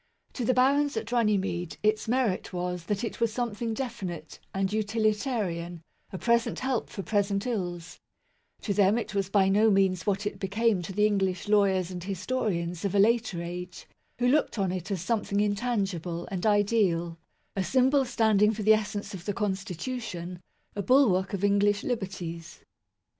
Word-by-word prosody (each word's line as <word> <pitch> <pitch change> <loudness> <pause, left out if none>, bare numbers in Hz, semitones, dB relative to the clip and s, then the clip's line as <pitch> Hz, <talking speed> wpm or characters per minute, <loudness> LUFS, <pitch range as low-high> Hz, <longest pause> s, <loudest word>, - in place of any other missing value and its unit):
To 250 - -3
the 255 - +2
barons 280 +1 +3
at 225 +1 -4
Runnymede 195 -9 0
its 215 +1 +1
merit 235 -5 0
was 180 -1 -3
that 205 +4 -2
it 235 - -5
was 230 -1 +2
something 230 -1 -2
definite 195 - -5
and 195 +1 -1
utilitarian 210 - -1 0.3
a 190 - -5
present 235 +3 +1
help 260 -2 -1
for 195 - -6
present 200 -1 0
ills 180 -7 -4 0.6
To 205 - -1
them, 200 +2 +4
it 235 - -4
was 195 -1 -1
by 195 -1 +3
no 210 +3 +4
means 190 -2 +2
what 200 0 0
it 205 - -3
became 205 0 +1
to 175 - -6
the 210 +2 +2
English 195 -3 0
lawyers 195 -3 +3
and 180 -1 -6
historians 185 -4 -2
of 200 -1 -1
a - - +4
later 220 -4 +2
age, 180 +1 -7 0.3
who 245 - +1
looked 285 -1 +2
on 190 -3 0
it 180 0 -4
as 190 -4 -2
something 205 -1 0
intangible 200 -6 -1
and 190 +2 -1
ideal, 195 -6 +2 0.4
a 195 - 0
symbol 265 +5 +3
standing 220 -4 +3
for 215 - -4
the 215 +1 +7
essence 210 -1 -2
of 180 -2 -8
the 205 - -1
Constitution, 190 -2 -4 0.3
a 205 - -1
bulwark 200 -5 +3
of 200 -1 -3
English 205 0 +3
liberties. 185 -8 -5
200 Hz, 165 wpm, -28 LUFS, 185-225 Hz, 0.6 s, the